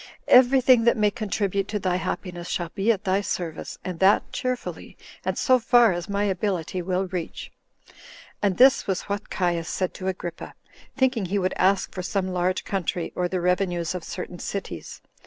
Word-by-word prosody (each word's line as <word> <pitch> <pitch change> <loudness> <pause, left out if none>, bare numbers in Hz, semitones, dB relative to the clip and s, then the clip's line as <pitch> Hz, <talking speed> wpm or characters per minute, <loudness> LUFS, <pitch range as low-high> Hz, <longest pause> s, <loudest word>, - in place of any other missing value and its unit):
Everything 255 -1 +6
that 235 - +4
may 210 -1 +3
contribute 200 -2 -1
to 210 - -2
thy 185 -2 0
happiness 180 -1 -4
shall 175 -2 -2
be 210 +3 +2
at 205 -2 -2
thy 195 0 +1
service, 175 -5 -4
and 180 -3 -5
that 195 +2 +4
cheerfully, 255 -2 -4 0.3
and - - -2
so 255 -1 +4
far 235 -2 +5
as 175 +3 -5
my 200 0 0
ability 190 -3 -1
will 185 +2 -1
reach." 175 -2 -5 0.3
34 - - -23 0.4
And 200 -3 +1
this 260 +1 +5
was 190 -2 -1
what 205 0 -4
Caius 175 -3 -1
said 185 -2 -2
to 185 - -6
Agrippa, 180 -2 -5 0.4
thinking 255 -6 +2
he 195 +3 -1
would 185 -1 0
ask 190 +1 +2
for 185 - -4
some 185 +1 -2
large 180 0 0
country, 180 -3 -2
or 180 - 0
the 185 +1 -2
revenues 180 -2 0
of 180 -2 -5
certain 180 0 -6
cities. 190 - -6
190 Hz, 180 wpm, -25 LUFS, 180-205 Hz, 0.4 s, Everything